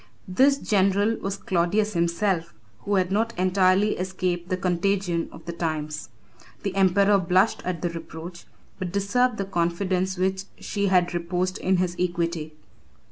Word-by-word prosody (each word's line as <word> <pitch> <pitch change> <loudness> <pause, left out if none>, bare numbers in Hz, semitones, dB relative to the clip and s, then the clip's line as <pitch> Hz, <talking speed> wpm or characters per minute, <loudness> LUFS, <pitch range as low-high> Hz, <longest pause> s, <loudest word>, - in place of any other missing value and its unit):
This 265 +9 +4
general 205 -1 +2
was 195 0 -4
Claudius 195 +4 0
himself, 170 0 0 0.2
who 205 - -1
had 185 -1 +1
not 225 +2 0
entirely 185 +2 +3
escaped 185 -1 -2
the 185 - 0
contagion 180 -1 0
of 160 - -13
the 170 - -4
times. 155 -2 -3 0.5
The 200 -2 -2
emperor 195 +1 +4
blushed 185 +4 +2
at 180 -2 -3
the 175 - +1
reproach, 170 +1 -8 0.3
but 185 -2 -3
deserved 220 +5 +1
the 195 - -2
confidence 185 +1 0
which 190 +1 0
she 200 -1 -1
had 180 -2 +3
reposed 175 +2 -1
in 190 0 +2
his 180 -1 0
equity. 170 -3 -2
185 Hz, 145 wpm, -25 LUFS, 175-195 Hz, 0.5 s, This